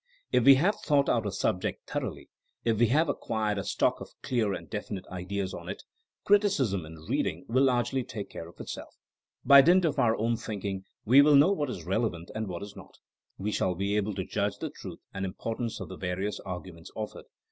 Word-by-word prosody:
If 125 - +3
we 135 0 +10
have 180 +10 +2
thought 145 -3 +3
out 115 -3 +1
a - - -2
subject 90 -1 -2
thoroughly, - - -4 0.4
if 115 -2 +2
we 120 - +5
have 155 +8 +3
acquired 110 -6 -1
a - - -3
stock 100 +1 +1
of - - -8
clear 115 -5 +1
and - - -5
definite 105 -2 -5
ideas 95 +1 -3
on - - -7
it, - - -6 0.4
criticism 145 - +2
in 80 - -10
reading 85 +3 -1
will 130 +4 +3
largely 125 0 +1
take 105 -4 -6
care 85 - -7
of - - -19
itself. - - -7 0.5
By 140 0 +10
dint 175 +5 +5
of 155 - 0
our 115 -1 +3
own 115 +1 0
thinking 100 -3 -4 0.2
we 130 +6 +8
will 145 0 +6
know 145 +7 +6
what 150 -8 -1
is 90 -9 -6
relevant 95 -3 -1
and 110 0 -3
what 90 +1 -5
is 100 - -9
not; - - -13 0.4
we 105 +2 -2
shall 95 -3 0
be 100 +3 -1
able 105 -1 0
to 95 -1 -3
judge 100 0 -1
the - - -5
truth - - -9
and 95 - -4
importance 115 +4 -4
of - - -6
the 95 - -8
various 95 +3 -3
arguments 90 -2 -8
offered. 110 -1 -6
105 Hz, 210 wpm, -29 LUFS, 95-130 Hz, 0.5 s, we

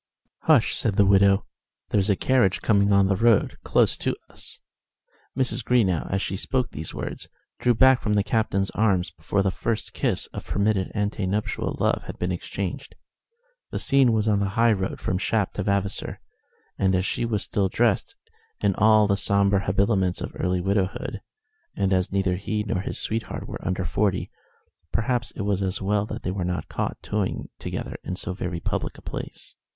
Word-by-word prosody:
"Hush!" - - +5
said 105 -4 0
the 100 - +5
widow, 100 0 +4 0.5
"there's 100 0 +2
a 100 - +4
carriage 120 -4 +2
coming 100 -2 +3
on 100 -1 +5
the 95 0 +2
road 115 +1 +3
close - - +3
to - - -1 0.2
us." - - -8 0.8
Mrs. 125 -2 0
Greenow, 105 -9 +2
as 95 0 0
she 95 - -2
spoke 125 +5 -1
these 80 +1 -5
words, - - -6 0.3
drew 120 -1 +3
back 130 +2 +5
from 105 - 0
the 100 - +3
Captain's 100 -3 0
arms 95 -6 +1
before 85 +4 -1
the 95 - +1
first 110 +4 -3
kiss - - 0
of - - -7
permitted 100 -2 +1
ante 105 -2 -1
nuptial 105 +3 -2
love - - +2
had - - -7
been 90 +1 -1
exchanged. 90 +1 -5 0.7
The - - -4
scene 135 -3 +4
was 110 -1 +1
on 105 -2 +3
the 100 -1 0
high 115 0 +5
road 95 -2 -3
from 90 - -1
Shap 105 -1 0
to - - -3
Vavasor, 100 0 -1 0.6
and 95 -1 +3
as 90 0 +1
she - - -1
was 110 -4 0
still 100 -2 0
dressed 115 0 +1 0.4
in 100 -1 +2
all 110 0 +6
the 100 -1 +2
sombre 100 0 +2
habiliments 95 -1 +2
of - - -5
early 90 0 0
widowhood, 95 0 -1 0.5
and 95 -1 +1
as 95 -1 +1
neither 95 -2 +1
he 105 +2 -2
nor 95 -3 -1
his - - -4
sweetheart 110 0 -3
were - - -7
under 95 0 -1
forty, 95 +3 0 0.6
perhaps 120 +1 0
it 105 - -3
was 100 -1 0
as 95 0 -1
well 100 +1 0
that - - -6
they 90 - -1
were 95 -1 -2
not 90 +1 -3
caught - - -2
toying 105 -3 -2
together - - -5
in 90 - -4
so 90 - -4
very 90 -2 -4
public - - -3
a - - -13
place. - - -7
100 Hz, 185 wpm, -25 LUFS, 95-110 Hz, 0.8 s, all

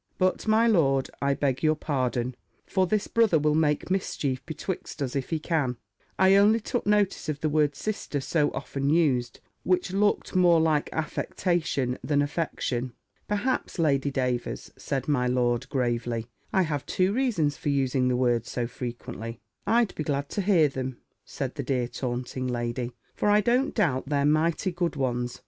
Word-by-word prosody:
But, 185 +3 +1
my 220 +2 +4
lord, 140 - +3
I 140 0 +2
beg 135 -3 0
your 155 0 +3
pardon; 130 -4 -1 0.3
for 190 -1 +1
this 210 +2 +1
brother 225 -7 +3
will 150 0 +2
make 150 +2 +1
mischief 140 -8 -1
betwixt 165 +1 -5
us 135 -2 -2
if 135 -2 -2
he 165 - 0
can 150 -6 -1 0.4
I 190 +1 +5
only 210 +3 +5
took 230 0 -3
notice 205 -5 +1
of 145 -2 -2
the 155 - +1
word 150 -1 +2
Sister 200 -5 -3
so 145 +2 +1
often 140 0 -3
used, 135 -7 +1 0.2
which 180 0 0
looked 205 0 +1
more 175 -2 +5
like 155 -2 +2
affectation 160 -4 -1
than 145 -1 +2
affection." 135 -5 -2 0.3
"Perhaps, 210 +4 -1
Lady 145 -4 +2
Davers," 125 -3 -2
said 135 -2 -3
my 135 -4 +2
lord, 125 0 +1
gravely, 120 -3 -1 0.3
"I 190 - +3
have 150 -4 -2
two 190 +1 +1
reasons 210 - +1
for 145 - -3
using 135 -2 +1
the 125 -1 +1
word 120 -2 +1
so 120 - -2
frequently." 120 -2 -6 0.3
"I'd 230 -2 +3
be 155 - -3
glad 140 -1 -2
to 205 - -2
hear 180 -6 +4
them," 130 -2 -4 0.3
said 135 -3 -4
the 140 - -4
dear 125 -2 0
taunting 125 +1 -4
lady; 120 0 -2 0.2
"for 210 - 0
I 210 +1 +5
don't 245 +6 +1
doubt 140 - +1
they're 140 -1 +2
mighty 155 +4 +2
good 175 -1 -1
ones. 125 -3 -2
145 Hz, 170 wpm, -27 LUFS, 130-180 Hz, 0.4 s, I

